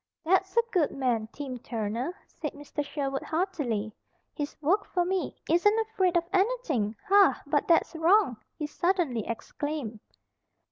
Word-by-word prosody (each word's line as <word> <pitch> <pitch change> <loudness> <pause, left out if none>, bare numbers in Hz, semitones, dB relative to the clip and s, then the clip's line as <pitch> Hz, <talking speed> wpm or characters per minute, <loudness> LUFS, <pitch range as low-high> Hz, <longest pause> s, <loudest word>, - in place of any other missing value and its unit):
"That's 380 +4 +2
a 470 - +6
good 345 -8 +3
man, 240 -5 0
Tim 265 -4 -6
Turner," 230 - -3
said 300 - -6
Mr. 290 +1 -5
Sherwood, 275 -2 -3
heartily. 290 - -2 0.4
"He's 290 -1 -5
worked 360 +7 +1
for 355 -1 0
me, 375 +1 -2
isn't 415 +6 +4
afraid 400 -6 +1
of 340 - +2
anything, 375 - +1
Ha! 400 0 +6
But 290 0 +1
that's 335 - +3
wrong!" 325 - +4 0.2
he 300 - -2
suddenly 310 - 0
exclaimed. 245 0 -4
310 Hz, 140 wpm, -28 LUFS, 260-375 Hz, 0.4 s, a